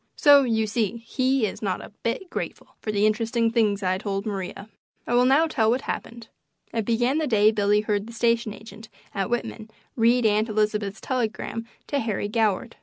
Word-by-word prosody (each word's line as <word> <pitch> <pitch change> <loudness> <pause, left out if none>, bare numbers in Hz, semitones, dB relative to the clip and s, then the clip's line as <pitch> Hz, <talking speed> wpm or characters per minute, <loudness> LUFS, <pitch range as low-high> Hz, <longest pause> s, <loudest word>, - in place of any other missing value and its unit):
So 285 -2 +7
you 225 -4 +1
see 220 0 -1
he 260 0 +1
is 205 - -5
not 190 -4 -1
a - - -11
bit 255 +11 -3
grateful - - -6
for 215 - -2
the 205 0 +2
interesting 225 +1 +1
things 215 -4 +1
I 185 0 0
told 200 -1 -3
Maria. 195 -1 -5 0.4
I - - -2
will 245 +1 +5
now 275 +5 +5
tell 225 -9 +1
what 250 +3 +1
happened. 235 -4 -6 0.5
It 225 -2 -1
began 240 +6 +1
the 310 - 0
day 215 -2 +4
Billy 210 -1 +2
heard 210 0 -1
the 235 - -10
station 230 -1 +1
agent 220 +1 -12 0.2
at 195 -2 -2
Whitman 235 -2 -3 0.3
read 235 +1 +3
Aunt 215 +1 +2
Elizabeth's 210 -1 -1
telegram 230 -2 -3 0.2
to 285 - -1
Harry 215 -4 -2
Goward. 215 -3 0
220 Hz, 185 wpm, -25 LUFS, 210-240 Hz, 0.5 s, So